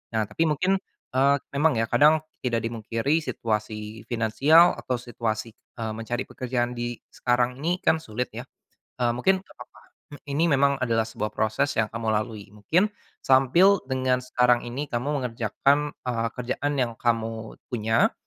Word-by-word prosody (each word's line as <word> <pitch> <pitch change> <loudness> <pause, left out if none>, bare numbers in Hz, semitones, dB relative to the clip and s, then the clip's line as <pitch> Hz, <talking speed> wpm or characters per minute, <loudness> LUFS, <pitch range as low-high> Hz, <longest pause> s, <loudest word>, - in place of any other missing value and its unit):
Nah 110 - +2
tapi 160 +10 -1
mungkin, 180 +6 +1 0.3
eee, 135 +2 +4 0.2
memang 150 +1 +2
ya, 115 - +1
kadang, 155 +1 +5 0.2
tidak 120 -3 -1
dipungkiri 115 +6 -1
situasi 110 -5 -4
finansial, 135 +9 +5
atau 125 - -2
situasi, 115 -2 -4
eee, 110 0 -7
mencari 115 +2 -3
pekerjaan 125 -1 -2
di, 120 0 -4 0.2
sekarang 125 +1 0
ini, 170 +5 0
kan 160 - +3
sulit 125 -4 -4
ya, - - -8 0.5
eee, 120 - +3
mungkin, 190 +8 +2
nggak 190 - -20
papa, - - -11 0.6
ini 145 +4 0
memang 140 0 +4
adalah 115 -2 +1
sebuah 105 -1 -4
proses 110 +7 0
yang 110 - +2
kamu 115 0 -5
lalui, 105 -1 -3
mungkin, 155 - +2 0.4
sambil 170 +10 +5
dengan 130 -1 +1
sekarang 125 -1 +2
ini 125 +5 -4
kamu 125 0 -3
mengerjakan, 125 +5 +1 0.2
eee, 115 -2 0
kerjaan 125 +4 -2
yang 120 -3 0
kamu, 115 -1 -1
punya, 110 -1 +1
120 Hz, 150 wpm, -25 LUFS, 115-140 Hz, 0.6 s, kadang